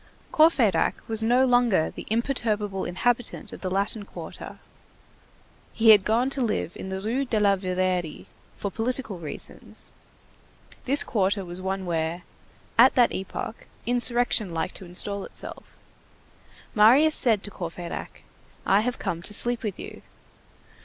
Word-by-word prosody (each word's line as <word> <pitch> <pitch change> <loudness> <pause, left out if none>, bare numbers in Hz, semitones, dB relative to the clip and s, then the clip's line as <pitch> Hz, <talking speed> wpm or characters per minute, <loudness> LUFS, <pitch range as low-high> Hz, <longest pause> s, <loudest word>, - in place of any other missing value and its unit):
Courfeyrac 250 - +3
was 225 -1 0
no 245 +4 +3
longer 245 -9 +2
the - - -10
imperturbable 215 -4 -1
inhabitant 240 +6 -2
of - - -10
the 185 - -3
Latin 200 +3 -1
Quarter, - - -9 1.2
he 225 -1 +6
had 205 -3 +6
gone 235 +6 +1
to 275 - -2
live 210 -7 -2
in 190 - -7
the 190 0 -4
Rue 230 +7 -1
de 235 -5 -1
la 200 -1 +4
Verrerie 185 -3 -2 0.3
"for 200 - -5
political 225 -3 -1
reasons"; 155 -3 -7 0.9
this 280 +3 +6
quarter 200 -3 0
was 175 +1 -7
one 190 0 -3
where, 165 0 -2 0.6
at 255 +3 +7
that 245 -2 +4
epoch, 190 +3 -6 0.2
insurrection 240 -5 +2
liked 160 +3 -2
to 190 - -9
install 195 +3 -1
itself. - - -8 1.0
Marius 255 +9 +5
said 225 -9 +3
to 205 - -8
Courfeyrac: 170 -2 -7 0.4
"I 195 +2 +4
have 250 +2 -2
come 170 - -4
to 210 +4 -2
sleep 240 +2 +3
with 205 -4 -4
you." - - -9
210 Hz, 140 wpm, -25 LUFS, 185-240 Hz, 1.2 s, at